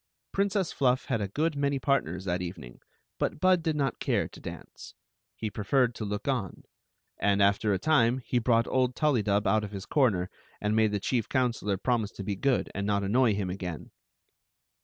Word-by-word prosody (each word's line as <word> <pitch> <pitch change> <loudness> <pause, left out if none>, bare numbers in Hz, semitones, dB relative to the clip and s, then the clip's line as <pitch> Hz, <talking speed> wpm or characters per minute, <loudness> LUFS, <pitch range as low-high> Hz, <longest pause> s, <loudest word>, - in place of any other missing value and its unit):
Princess 195 -2 0
Fluff 130 -1 +1
had 115 -5 -1
a 100 - -1
good 155 - -1
many 140 0 0
partners 95 - 0
that 90 -1 -1
even 90 +1 -6
ing, - - -13 0.4
but - - -1
Bud 185 0 +4
did 160 -1 -1
not 140 -4 -1
care - - 0
to - - -13
dance— - - -10 0.4
he 110 -2 -4
preferred 120 +4 +1
to 110 - -5
look 105 +3 -4
on; 120 -10 -2 0.6
and. 100 0 +2
after 100 +1 +3
a 95 - +2
time, 130 -3 +3
he 125 - +1
brought 115 0 +3
old 125 -1 +1
Tullydub 110 -9 +1
out 105 +2 +2
of 105 - -4
his 100 -1 -7
corner, 105 - +1 0.3
and 105 +1 0
made 110 -1 +3
the 105 - -1
chief 115 +2 -1
counselor 120 -6 0
prom 120 +3 +1
ise 105 0 -5
to 100 - -7
be 100 +1 -2
good 130 +6 +1
and 100 0 -3
not 100 -1 +1
annoy 110 +2 +3
him 95 -3 -2
again. 90 -4 -6
110 Hz, 200 wpm, -28 LUFS, 100-130 Hz, 0.6 s, Bud